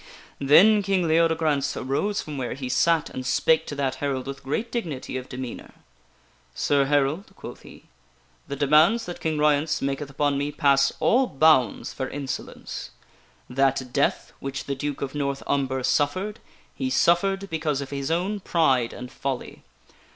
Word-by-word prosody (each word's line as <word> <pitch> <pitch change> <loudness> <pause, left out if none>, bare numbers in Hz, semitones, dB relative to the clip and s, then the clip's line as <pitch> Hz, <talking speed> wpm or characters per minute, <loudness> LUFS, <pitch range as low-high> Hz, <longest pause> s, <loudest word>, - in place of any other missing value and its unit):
Then 195 +10 +6
King 190 -3 +1
Leodegrance 160 -3 +2
arose 200 +11 -1
from 150 -3 -6
where 120 -2 -3
he 130 -2 -5
sat 165 +4 +2
and 130 - -5
spake 160 +5 +2
to 145 - -5
that 135 -2 -1
herald 135 -3 -2
with 135 0 -7
great 210 - -3
dignity 160 - -4
of 130 0 -5
demeanor. 130 -2 -7 0.4
" 60 - -35 0.3
Sir 140 -1 +2
Herald," 145 +6 0
quoth - - -10
he, - - -14 0.3
" - - -36
the 140 - -4
demands 155 - +4
that 175 - -7
King 160 -1 -1
Ryence 150 +1 +2
maketh 140 +1 -3
upon 140 0 0
me 145 +1 -2
pass 140 -2 +3
all 255 +2 +3
bounds 135 - +3
for 130 -1 -4
insolence. 140 -2 -6 0.6
That 130 -1 0
death 140 - 0
which 135 0 -5
the 140 - -3
Duke 145 +1 -4
of 135 - -4
North 140 -2 -2
Umber 130 -2 -1
suffered, 185 - 0 0.3
he 265 - -3
suffered 195 -2 +2
because 155 -3 -1
of 140 -1 -6
his 140 0 -3
own 185 +5 -1
pride 135 -10 +1
and 125 +1 -8
folly. 135 -1 -5
145 Hz, 165 wpm, -25 LUFS, 135-165 Hz, 0.6 s, Then